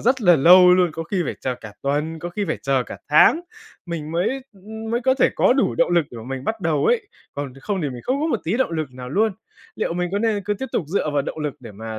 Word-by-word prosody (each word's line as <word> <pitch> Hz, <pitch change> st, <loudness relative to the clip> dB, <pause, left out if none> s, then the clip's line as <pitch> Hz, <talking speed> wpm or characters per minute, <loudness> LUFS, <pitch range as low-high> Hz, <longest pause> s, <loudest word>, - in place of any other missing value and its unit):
rất 260 Hz, +2 st, +2 dB
là 175 Hz, -3 st, +6 dB
lâu 180 Hz, +5 st, +8 dB
luôn, 180 Hz, -2 st, +3 dB
có 165 Hz, -, -4 dB
khi 180 Hz, +2 st, -1 dB
phải -, -, -3 dB
chờ 130 Hz, -, -2 dB
cả 105 Hz, -2 st, -10 dB
tuần, 150 Hz, +4 st, -1 dB
có 175 Hz, -, -5 dB
khi 205 Hz, +4 st, -3 dB
phải -, -, 0 dB
chờ 135 Hz, -2 st, +1 dB
cả -, -, -9 dB
tháng, 150 Hz, -, +6 dB, 0.5 s
mình 160 Hz, -3 st, -5 dB
mới, 175 Hz, +3 st, +1 dB, 0.2 s
ư, 195 Hz, -, -21 dB, 0.3 s
mới 235 Hz, +1 st, 0 dB
có 260 Hz, +1 st, +2 dB
thể 265 Hz, -, +3 dB
có -, -, +4 dB
đủ 270 Hz, +1 st, +1 dB
động 255 Hz, -, +2 dB
lực 170 Hz, -2 st, +3 dB
để 120 Hz, -, -10 dB
mà 110 Hz, -, -9 dB
mình 135 Hz, 0 st, -5 dB
bắt 220 Hz, +4 st, -2 dB
đầu 160 Hz, -4 st, 0 dB
ấy. 455 Hz, -4 st, +1 dB, 0.3 s
Còn 140 Hz, -2 st, -5 dB
không 195 Hz, +4 st, -2 dB
thì 145 Hz, -, -1 dB
mình 120 Hz, -2 st, -8 dB
không 265 Hz, +2 st, -1 dB
có 310 Hz, -, +1 dB
một 240 Hz, -9 st, -1 dB
tí 180 Hz, +7 st, 0 dB
động 260 Hz, -, +1 dB
lực 155 Hz, -4 st, -3 dB
nào 125 Hz, 0 st, -8 dB
luôn. 215 Hz, -, +1 dB, 0.4 s
Liệu 215 Hz, -, -2 dB
mình 180 Hz, +1 st, -1 dB
có 200 Hz, -, +1 dB
nên 215 Hz, -2 st, 0 dB
cứ 205 Hz, 0 st, 0 dB
tiếp 265 Hz, +6 st, -5 dB
tục 165 Hz, -, 0 dB
dựa 155 Hz, -3 st, -1 dB
vào 145 Hz, -1 st, +1 dB
động 160 Hz, -, -6 dB
lực 150 Hz, -2 st, -3 dB
để 115 Hz, -4 st, -10 dB
mà 110 Hz, +1 st, -7 dB
170 Hz, 285 wpm, -22 LUFS, 140-210 Hz, 0.5 s, lâu